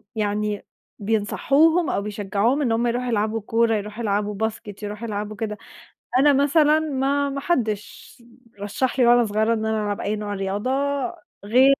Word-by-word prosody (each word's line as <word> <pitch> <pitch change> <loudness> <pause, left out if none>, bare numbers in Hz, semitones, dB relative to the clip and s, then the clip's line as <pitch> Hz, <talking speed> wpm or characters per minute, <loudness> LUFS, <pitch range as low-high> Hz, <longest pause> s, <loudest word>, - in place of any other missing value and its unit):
يعني 210 -1 -1 0.3
بينصحوهم 275 - +2
أو - - 0
بيشجعوهم 210 +5 0
إن 250 -5 +1
هم 235 +2 +1
يروحوا 245 +1 -1
يلعبوا 220 0 0
كورة، 225 +2 +2
يروحوا 210 +2 -5
يلعبوا 205 0 -1
basket 210 -1 -11
يروحوا 210 +3 -5
يلعبوا 210 0 -4
كده، 210 0 -4 0.6
أنا 290 +1 +5
مثلًا 295 +2 +4
ما 280 -1 0
ما 275 - -3
حدش 225 - -3 0.4
رشّح 240 +6 -2
لي 245 - +5
وأنا 240 0 +5
صغيرة 220 +2 +1
إن 220 -1 -2
أنا 220 -1 0
ألعب 205 -1 -2
أي 210 +2 -1
نوع 210 -1 -4
رياضة، 195 +4 -2 0.8
غير 250 +5 +5
220 Hz, 160 wpm, -23 LUFS, 210-260 Hz, 0.8 s, أنا